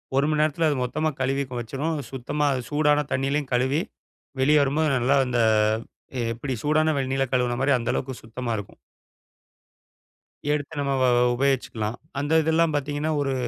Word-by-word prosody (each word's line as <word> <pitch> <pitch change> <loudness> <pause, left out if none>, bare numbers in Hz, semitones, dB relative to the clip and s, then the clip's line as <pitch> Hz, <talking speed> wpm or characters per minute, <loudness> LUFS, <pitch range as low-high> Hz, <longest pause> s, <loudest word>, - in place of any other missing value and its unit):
1 140 +2 +3
மணி 155 -1 +1
நேரத்தில 155 +1 +2
அது 145 - 0
மொத்தமா 155 +6 -1
கழுவி 135 +2 +1
கொ - - -8
வச்சுரும். 140 +8 -3 0.2
சுத்தமா 135 +3 -2
அது 130 - -2
சூடான 150 0 +3
தண்ணியிலயும் 135 +1 0
கழுவி, 130 +5 +2 0.6
வெளிய 150 +3 +5
வரும்போது 150 +3 +1
நல்லா 125 +3 +2
அந்த 125 -1 0 0.9
எப்படி 130 +4 -4
சூடான 155 +1 +2
வெந்நீர்ல 135 0 0
கழுவுனமாரி 125 +2 +1
அந்த 115 - -1
அளவுக்கு 130 -1 -4
சுத்தமா 120 +2 -5
இருக்கும். 105 - -8 1.7
எடுத்து 145 -1 -2
நம்ம 140 -1 0
வ - - +4
வ - - +4 0.2
உபயோகிச்சிக்கலாம். 120 -4 -1 0.2
அந்த 155 +3 +3
இதெல்லாம் 160 0 +2
பார்த்தீங்கன்னா, 145 +2 -1
ஒரு 135 -1 0
140 Hz, 150 wpm, -24 LUFS, 130-150 Hz, 1.7 s, வெளிய